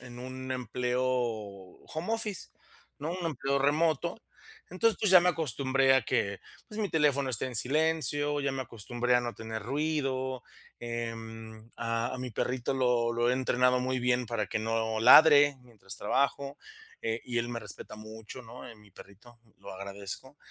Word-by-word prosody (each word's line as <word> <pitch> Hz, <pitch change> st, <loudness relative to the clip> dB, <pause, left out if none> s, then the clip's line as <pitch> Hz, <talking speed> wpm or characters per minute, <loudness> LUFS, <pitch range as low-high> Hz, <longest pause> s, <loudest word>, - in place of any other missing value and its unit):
en 120 Hz, -1 st, -10 dB
un 130 Hz, +1 st, -7 dB
empleo 125 Hz, 0 st, -1 dB
home 120 Hz, -, -3 dB
office, 215 Hz, -4 st, -1 dB, 0.5 s
¿no? 150 Hz, +3 st, -3 dB
Un 180 Hz, -1 st, -3 dB
empleo 140 Hz, -2 st, -1 dB
remoto, 160 Hz, -, +1 dB, 0.5 s
entonces, 225 Hz, +5 st, +2 dB
pues, 210 Hz, -, +1 dB
ya 185 Hz, -, +9 dB
me 180 Hz, -, +2 dB
acostumbré 135 Hz, -4 st, +2 dB
a 130 Hz, -, +4 dB
que, 100 Hz, -3 st, -1 dB, 0.3 s
pues, 215 Hz, +1 st, -5 dB
mi 205 Hz, -, 0 dB
teléfono 140 Hz, -5 st, +2 dB
esté 115 Hz, -, -1 dB
en 125 Hz, -, -7 dB
silencio, 145 Hz, +2 st, +1 dB
ya 140 Hz, -1 st, 0 dB
me 135 Hz, 0 st, -3 dB
acostumbré 120 Hz, +1 st, -1 dB
a 125 Hz, -, +5 dB
no 120 Hz, -1 st, -4 dB
tener 110 Hz, -1 st, -6 dB
ruido. 130 Hz, -1 st, -1 dB, 0.4 s
Em, 115 Hz, -1 st, -6 dB
a 115 Hz, +2 st, -1 dB
a -, -, -6 dB
mi 125 Hz, 0 st, -4 dB
perrito 125 Hz, +3 st, -1 dB
lo 125 Hz, -2 st, +2 dB
lo 120 Hz, +1 st, +2 dB
he -, -, +2 dB
entrenado 125 Hz, 0 st, +2 dB
muy 130 Hz, 0 st, -1 dB
bien 125 Hz, 0 st, +1 dB
para 105 Hz, -2 st, -2 dB
que -, -, -2 dB
no 110 Hz, 0 st, -1 dB
ladre 145 Hz, +3 st, +8 dB
mientras 110 Hz, -6 st, -10 dB
trabajo. 140 Hz, +5 st, 0 dB, 0.4 s
Eh, 115 Hz, +1 st, -1 dB
y 120 Hz, -, -4 dB
él 120 Hz, 0 st, -1 dB
me 120 Hz, -1 st, -4 dB
respeta 105 Hz, -3 st, -8 dB
mucho, 110 Hz, +3 st, -9 dB
¿no? 120 Hz, +2 st, -11 dB
Eh, 120 Hz, -, -10 dB
mi 105 Hz, -1 st, -20 dB
perrito, 110 Hz, +6 st, -16 dB, 0.2 s
lo -, -, -10 dB
agradezco, 100 Hz, +7 st, -7 dB
125 Hz, 170 wpm, -30 LUFS, 115-140 Hz, 0.5 s, ya